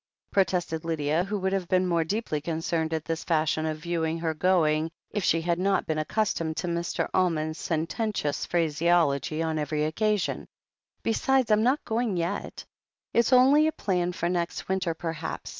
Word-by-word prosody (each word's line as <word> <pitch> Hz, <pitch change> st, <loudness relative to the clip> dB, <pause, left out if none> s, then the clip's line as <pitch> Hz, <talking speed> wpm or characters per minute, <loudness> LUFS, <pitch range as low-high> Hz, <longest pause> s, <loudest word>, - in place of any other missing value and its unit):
protested 175 Hz, -4 st, 0 dB
Lydia, 160 Hz, 0 st, 0 dB
who 205 Hz, +2 st, -3 dB
would 190 Hz, 0 st, -1 dB
have 190 Hz, -3 st, -1 dB
been 185 Hz, +1 st, +2 dB
more 170 Hz, -2 st, +2 dB
deeply 160 Hz, -4 st, -2 dB
concerned 160 Hz, 0 st, -2 dB
at 160 Hz, -1 st, -2 dB
this 165 Hz, -1 st, -3 dB
fashion 155 Hz, -1 st, +1 dB
of 155 Hz, -1 st, -2 dB
viewing 165 Hz, 0 st, -2 dB
her 165 Hz, -1 st, -1 dB
going 160 Hz, -2 st, +2 dB, 0.2 s
if 205 Hz, -, -2 dB
she 165 Hz, 0 st, +2 dB
had 170 Hz, +1 st, 0 dB
not 195 Hz, +1 st, +1 dB
been 155 Hz, -1 st, -1 dB
accustomed 165 Hz, -2 st, -1 dB
to -, -, -2 dB
Mr. 170 Hz, 0 st, -1 dB
Almond's 160 Hz, -3 st, +1 dB
sententious 165 Hz, 0 st, -2 dB
phraseology 165 Hz, -2 st, +1 dB
on 160 Hz, -1 st, -1 dB
every 150 Hz, 0 st, -1 dB
occasion. 210 Hz, +5 st, 0 dB, 0.6 s
"Besides, 260 Hz, 0 st, +2 dB
Fm 215 Hz, 0 st, +5 dB
not 260 Hz, +6 st, +1 dB
going 225 Hz, -4 st, 0 dB
yet. 175 Hz, +4 st, -3 dB, 0.5 s
It's 235 Hz, +1 st, +3 dB
only 270 Hz, +5 st, +6 dB
a -, -, +1 dB
plan 180 Hz, -, -1 dB
for 170 Hz, -1 st, -2 dB
next 175 Hz, -1 st, -2 dB
winter 185 Hz, -3 st, -1 dB
perhaps. 160 Hz, -1 st, -5 dB
170 Hz, 165 wpm, -27 LUFS, 160-195 Hz, 0.6 s, only